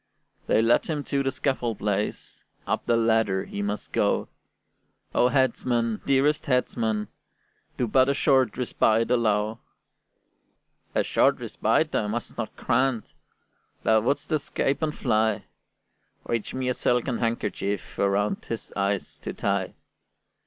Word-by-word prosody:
They 110 Hz, -, +3 dB
led 115 Hz, +1 st, +3 dB
him 150 Hz, -3 st, -2 dB
to 140 Hz, -1 st, -1 dB
the 135 Hz, -, 0 dB
scaffold 130 Hz, -4 st, -1 dB
place, 105 Hz, 0 st, -3 dB, 0.2 s
Up -, -, -2 dB
the 115 Hz, -, +3 dB
ladder 110 Hz, -4 st, +2 dB
he 100 Hz, -, -5 dB
must 105 Hz, +1 st, -3 dB
go: -, -, +1 dB, 0.8 s
"O 125 Hz, -, +4 dB
headsman, 120 Hz, -3 st, +1 dB
dearest 145 Hz, +3 st, +2 dB
headsman, 115 Hz, -5 st, 0 dB, 0.7 s
do 125 Hz, -, +1 dB
But 130 Hz, +4 st, +4 dB
a 140 Hz, -, +2 dB
short 130 Hz, -5 st, +3 dB
respite 115 Hz, -2 st, +2 dB
allow!" 110 Hz, -2 st, +1 dB, 1.4 s
"A -, -, +3 dB
short -, -, +3 dB
respite -, -, 0 dB
I 105 Hz, -, +1 dB
must 115 Hz, +3 st, -4 dB
not 110 Hz, -2 st, -5 dB
grant; 130 Hz, -2 st, 0 dB, 0.7 s
Thou 110 Hz, -1 st, +4 dB
wouldst 145 Hz, +7 st, -1 dB
escape 140 Hz, -1 st, 0 dB
and 155 Hz, -1 st, -1 dB
fly: 110 Hz, -4 st, +1 dB, 0.8 s
Reach 115 Hz, 0 st, -2 dB
me 130 Hz, -1 st, -2 dB
a -, -, +2 dB
silken 125 Hz, 0 st, 0 dB
handkerchief 105 Hz, -3 st, -2 dB
Around 100 Hz, +1 st, +1 dB
his 115 Hz, -, -6 dB
eyes 100 Hz, 0 st, -2 dB
to -, -, -5 dB
tie." -, -, -1 dB
115 Hz, 130 wpm, -26 LUFS, 105-130 Hz, 1.4 s, O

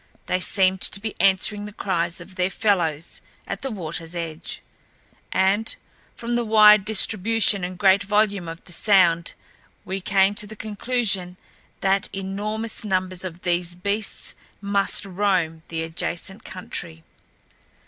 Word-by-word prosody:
They 185 Hz, -, 0 dB
seemed 190 Hz, 0 st, +2 dB
to -, -, +1 dB
be 215 Hz, +1 st, -4 dB
answering 205 Hz, +2 st, +2 dB
the -, -, -9 dB
cries 185 Hz, -4 st, -1 dB
of 190 Hz, -, -11 dB
their 185 Hz, 0 st, 0 dB
fellows 175 Hz, -7 st, 0 dB, 0.2 s
at -, -, -5 dB
the 270 Hz, -, -3 dB
waterl's 170 Hz, -5 st, -6 dB
edge, 165 Hz, -1 st, -5 dB, 0.7 s
and 195 Hz, +4 st, +1 dB, 0.4 s
from 235 Hz, +1 st, -4 dB
the 240 Hz, -, +1 dB
wide 210 Hz, -2 st, +7 dB
distribution 215 Hz, -1 st, +3 dB
and 180 Hz, 0 st, -4 dB
great 195 Hz, 0 st, +5 dB
volume 205 Hz, -3 st, +1 dB
of 165 Hz, +1 st, -8 dB
the -, -, -14 dB
sound 175 Hz, -4 st, +3 dB, 0.5 s
we 190 Hz, +1 st, -4 dB
came 195 Hz, +1 st, +3 dB
to 210 Hz, 0 st, -2 dB
the 220 Hz, -, -10 dB
conclusion 205 Hz, -4 st, -1 dB, 0.4 s
that 195 Hz, 0 st, +1 dB
enormous 210 Hz, +4 st, -3 dB
numbers 185 Hz, -2 st, -1 dB
of 180 Hz, -1 st, -7 dB
these 175 Hz, -1 st, 0 dB
beasts 200 Hz, +3 st, -2 dB, 0.3 s
must 200 Hz, -1 st, 0 dB
roam 185 Hz, -4 st, 0 dB
the 160 Hz, -1 st, -3 dB
adjacent 175 Hz, +5 st, -4 dB
country. 170 Hz, -3 st, -7 dB
195 Hz, 140 wpm, -23 LUFS, 180-210 Hz, 0.7 s, wide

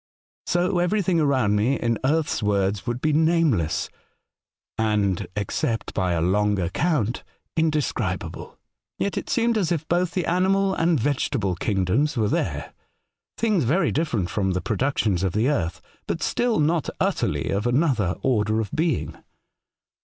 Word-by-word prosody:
So 180 Hz, +1 st, +1 dB
every 195 Hz, +4 st, +1 dB
thing 175 Hz, -2 st, +2 dB
around 130 Hz, -9 st, +2 dB
me, 115 Hz, +7 st, +2 dB
in 115 Hz, -1 st, 0 dB
earth's 150 Hz, -1 st, +1 dB
words, 100 Hz, 0 st, 0 dB
would 120 Hz, +1 st, -2 dB
be 155 Hz, -1 st, +1 dB
nameless, 155 Hz, -, +2 dB, 0.9 s
and, 105 Hz, -4 st, 0 dB
except 110 Hz, +4 st, -2 dB
by 90 Hz, -2 st, 0 dB
a 85 Hz, -, 0 dB
long 105 Hz, +3 st, +2 dB
account, 115 Hz, -, 0 dB, 0.3 s
in 160 Hz, -1 st, +3 dB
describable. 150 Hz, -2 st, -3 dB, 0.4 s
Yet 200 Hz, -, -1 dB
it -, -, -4 dB
seemed 230 Hz, -2 st, +2 dB
as 180 Hz, -4 st, 0 dB
if 160 Hz, -2 st, -1 dB
both 175 Hz, 0 st, +1 dB
the 180 Hz, -, 0 dB
animal 190 Hz, +2 st, +2 dB
and 165 Hz, -4 st, +2 dB
vegetable 130 Hz, -6 st, 0 dB
kingdoms 100 Hz, -, 0 dB
were 110 Hz, -3 st, +1 dB
there -, -, -2 dB, 0.3 s
— -, -, -61 dB
things 215 Hz, -8 st, +2 dB
very 160 Hz, +7 st, +2 dB
different 120 Hz, -, -1 dB
from 95 Hz, -3 st, 0 dB
the 90 Hz, -, 0 dB
productions 110 Hz, -5 st, 0 dB
of 95 Hz, -2 st, 0 dB
the 110 Hz, +4 st, +1 dB
earth, 85 Hz, -, -1 dB, 0.3 s
but -, -, -2 dB
still 240 Hz, -2 st, +1 dB
not 155 Hz, +1 st, +1 dB
utterly -, -, 0 dB
of 100 Hz, +4 st, 0 dB
another 120 Hz, -, +1 dB
order 110 Hz, -4 st, +1 dB
of 110 Hz, -3 st, -3 dB
being. 160 Hz, -4 st, -1 dB
130 Hz, 155 wpm, -24 LUFS, 105-165 Hz, 0.9 s, in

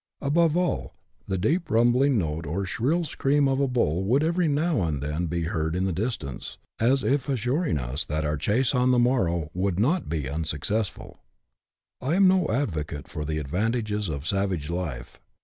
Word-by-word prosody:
Above 160 Hz, +3 st, +2 dB
all, 180 Hz, -1 st, -1 dB, 0.3 s
the 95 Hz, -, -1 dB
deep 155 Hz, -, 0 dB
rumbling 120 Hz, +3 st, +3 dB
note 80 Hz, -3 st, -2 dB
or 95 Hz, +6 st, -2 dB
shrill 140 Hz, -, 0 dB
scream 145 Hz, -2 st, +1 dB
of 135 Hz, 0 st, +1 dB
a 140 Hz, -, +2 dB
bull 95 Hz, -, +1 dB
would 130 Hz, +9 st, +2 dB
every 170 Hz, +1 st, +1 dB
now 150 Hz, -, +1 dB
and 80 Hz, -5 st, -1 dB
then 75 Hz, +5 st, -2 dB
be 85 Hz, +1 st, -2 dB
heard 80 Hz, 0 st, -1 dB
in 90 Hz, +1 st, 0 dB
the 95 Hz, -, 0 dB
distance, 95 Hz, -, -4 dB, 0.2 s
as 130 Hz, +4 st, +3 dB
if 140 Hz, 0 st, 0 dB
assuring 130 Hz, -, 0 dB
us 65 Hz, +4 st, -2 dB
that 75 Hz, +1 st, -2 dB
our 75 Hz, +1 st, 0 dB
chase 115 Hz, -, +1 dB
on 125 Hz, -1 st, +3 dB
the 125 Hz, -, +4 dB
morrow 90 Hz, -, +1 dB
would 95 Hz, 0 st, -1 dB
not 155 Hz, -, +1 dB
be 75 Hz, -5 st, -2 dB
unsuccessful. 80 Hz, +8 st, -3 dB, 0.8 s
I 140 Hz, +6 st, 0 dB
am 195 Hz, 0 st, +6 dB
no 185 Hz, -3 st, +3 dB
advocate 80 Hz, -, -2 dB
for 75 Hz, -, -5 dB
the 75 Hz, +1 st, -2 dB
advantages 105 Hz, -, -1 dB
of 70 Hz, -1 st, -4 dB
savage 95 Hz, -5 st, -1 dB
life. 80 Hz, -9 st, -5 dB
105 Hz, 180 wpm, -26 LUFS, -, 0.8 s, am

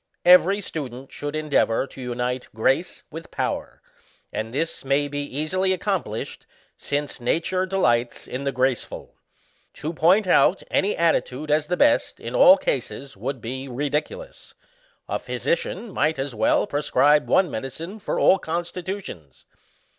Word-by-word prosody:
Every 180 Hz, +3 st, +6 dB
student 135 Hz, -7 st, -6 dB
should 145 Hz, +1 st, -5 dB
endeavour 150 Hz, -6 st, +1 dB
to 135 Hz, -, -12 dB
unite 125 Hz, +1 st, -3 dB
grace 135 Hz, +10 st, 0 dB
with 165 Hz, +2 st, -8 dB
power, -, -, -4 dB, 0.5 s
and 110 Hz, +1 st, -3 dB
this 160 Hz, +6 st, -2 dB
mny 140 Hz, +1 st, 0 dB
be 145 Hz, 0 st, -2 dB
easily 155 Hz, +7 st, -1 dB
accomplished, 180 Hz, -, -3 dB, 0.3 s
since 145 Hz, -2 st, -3 dB
nature 185 Hz, +8 st, 0 dB
delights 120 Hz, -11 st, +1 dB
in 130 Hz, +2 st, -5 dB
the 140 Hz, -, 0 dB
graceful. 130 Hz, -2 st, -2 dB, 0.6 s
To 155 Hz, +3 st, -4 dB
point 180 Hz, +7 st, +4 dB
out 185 Hz, +1 st, +4 dB
any 200 Hz, +2 st, +1 dB
attitude 155 Hz, -3 st, 0 dB
as 150 Hz, 0 st, +2 dB
the 180 Hz, -, -1 dB
best 290 Hz, 0 st, +2 dB
in -, -, -6 dB
all 290 Hz, -, +8 dB
cases 140 Hz, -, -3 dB
would 130 Hz, +5 st, -4 dB
be 130 Hz, +4 st, -5 dB
ridiculous; 150 Hz, -, -4 dB, 0.5 s
a -, -, -2 dB
physician 475 Hz, -, -2 dB
might 155 Hz, -2 st, +1 dB
as 135 Hz, 0 st, -3 dB
well 110 Hz, 0 st, +2 dB
prescribe 145 Hz, 0 st, +2 dB
one 185 Hz, -5 st, +3 dB
medicine 160 Hz, -, -6 dB
for -, -, -2 dB
all 190 Hz, -, +5 dB
constitutions. 175 Hz, -, -6 dB
150 Hz, 140 wpm, -24 LUFS, 130-185 Hz, 0.6 s, all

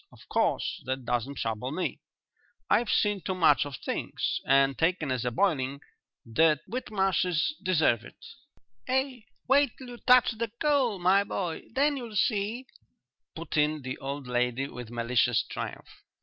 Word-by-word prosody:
Of -, -, -18 dB
course -, -, 0 dB
that 130 Hz, -1 st, -3 dB
doesn't 120 Hz, +3 st, -1 dB
trouble 115 Hz, +1 st, -3 dB
me; 180 Hz, +4 st, -3 dB, 0.7 s
I've 235 Hz, -2 st, +3 dB
seen 205 Hz, -2 st, +2 dB
too 190 Hz, -, -3 dB
much 150 Hz, -6 st, +4 dB
of 140 Hz, -3 st, -7 dB
things. -, -, -3 dB
And, 135 Hz, 0 st, +4 dB
taken 165 Hz, -4 st, 0 dB
as 125 Hz, -1 st, -1 dB
a -, -, +2 dB
boiling, 140 Hz, -, 0 dB, 0.5 s
the 150 Hz, +7 st, +3 dB
Whitmarshes 195 Hz, -, 0 dB
deserve 155 Hz, -, +2 dB
it." -, -, -14 dB, 0.7 s
"Ah, 260 Hz, -2 st, 0 dB, 0.2 s
wait 275 Hz, -1 st, +3 dB
till 255 Hz, -2 st, -10 dB
you 240 Hz, -, -9 dB
touch 250 Hz, 0 st, +5 dB
the 225 Hz, -1 st, -4 dB
coal, 275 Hz, -8 st, +2 dB
my 185 Hz, +3 st, +4 dB
boy, 180 Hz, -4 st, -4 dB
then 280 Hz, +4 st, +2 dB
you'll 235 Hz, -4 st, -7 dB
see," 215 Hz, +3 st, 0 dB, 0.7 s
put 165 Hz, -1 st, -5 dB
in 150 Hz, -1 st, +1 dB
the 130 Hz, 0 st, -5 dB
old 140 Hz, 0 st, -5 dB
lady, 125 Hz, +2 st, 0 dB
with 125 Hz, -3 st, -8 dB
malicious 120 Hz, 0 st, +1 dB
triumph. -, -, -7 dB
165 Hz, 150 wpm, -28 LUFS, -, 0.7 s, touch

